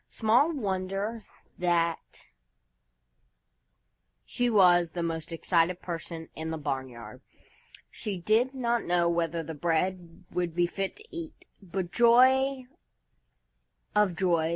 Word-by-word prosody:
Small 240 +8 +3
wonder 200 - -3 0.3
that 170 -2 -1 2.0
she 245 0 0
was 180 -5 +5
the 170 +1 -3
most 165 0 -4
excited 170 +1 +1
person 165 -2 -6
in 160 0 -5
the 160 - -3
barnyard! 130 -7 -5 0.7
She 205 -3 -5
did 225 +9 +1
not 240 -2 0
know 175 -1 +2
whether 170 -1 -1
the 160 +1 -6
bread 170 +2 -2
would 175 -2 -2
be 175 0 +3
fit 195 +2 -3
to 430 - -15
eat, 330 -2 -8 0.2
but 185 -1 -4
joy 260 +3 +4 1.3
of 210 -4 +3
joys! 170 -4 +1
180 Hz, 115 wpm, -28 LUFS, 165-220 Hz, 2.0 s, was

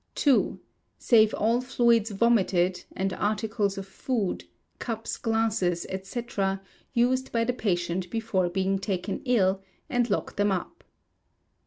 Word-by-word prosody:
ii. 275 -3 +3 0.4
Save 220 -3 +5
all 230 +3 +2
fluids 235 -3 +2
vomited, 195 -4 +2
and 190 0 -1
articles 210 0 -1
of 195 - -5
food, 205 0 -2 0.3
cups, 225 -2 -3
glasses, 225 -6 0 0.2
&c., 235 +4 -4 0.7
used 255 +2 +2
by 230 -1 +1
the 250 +2 0
patient 180 -5 -1
before 215 -4 0
being 190 +2 0
taken 190 0 -3
ill, 195 -6 +2 0.3
and 245 -2 +1
lock 205 - -2
them 205 0 +2
up. 190 - -4
215 Hz, 125 wpm, -27 LUFS, 190-235 Hz, 0.7 s, Save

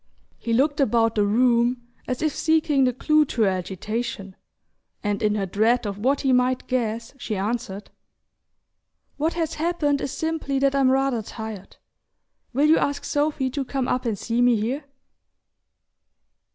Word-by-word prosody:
He 230 - -4
looked 285 +6 +2
about 230 -3 +3
the 210 - +2
room, 240 +2 +2 0.2
as 255 +3 -2
if 310 -2 +1
seeking 310 -4 +2
the 250 - +2
clue 305 +5 +3
to 235 -4 0
her 200 - +4
agitation, 190 +2 -4 0.7
and 205 -1 -1
in 210 -1 +2
her 200 -2 -1
dread 220 +6 +1
of 200 -1 -4
what 270 +6 +1
he 265 -1 +2
might 250 0 +2
guess 230 -2 -2
she 220 - -3
answered: 205 0 -4 1.3
"What 315 +3 0
has 325 -2 -2
happened 310 -4 0
is 275 - -3
simply 320 -4 -2
that 275 0 +2
I'm 275 -2 +3
rather 265 -3 +1
tired. 220 -2 -8 0.7
Will 275 +4 +2
you 315 +1 +5
ask 285 0 -1
Sophy 290 -3 0
to 280 +1 -2
come 265 -1 -2
up 250 0 -1
and 220 -3 -1
see 235 +4 -1
me 245 -1 +5
here?" 250 +7 -2
250 Hz, 160 wpm, -24 LUFS, 220-280 Hz, 1.3 s, you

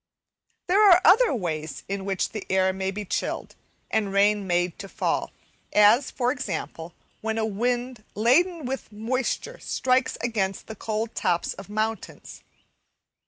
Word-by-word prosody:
There 385 +4 +3
are 355 -1 +8
other 450 +7 +6
ways 160 - -3
in 195 0 -4
which 195 -2 -1
the 215 -3 -6
air 190 0 +2
may 190 0 -2
be 205 +2 -5
chilled, - - -3 0.4
and 205 -3 0
rain 200 0 +3
made 175 -1 0
to 195 - -7
fall, - - -1 0.4
as, 210 +6 +5
for 245 -1 0
example, 175 - -5 0.3
when 220 0 -2
a 220 - +1
wind 240 +2 -2
laden 305 - +3
with 265 -1 -5
moisture 255 - -2
strikes 255 0 0
against 200 -5 -2
the 220 - -8
cold 220 +2 -3
tops 175 0 0
of 195 - -11
mountains. 215 +1 -4
215 Hz, 145 wpm, -25 LUFS, 195-250 Hz, 0.4 s, are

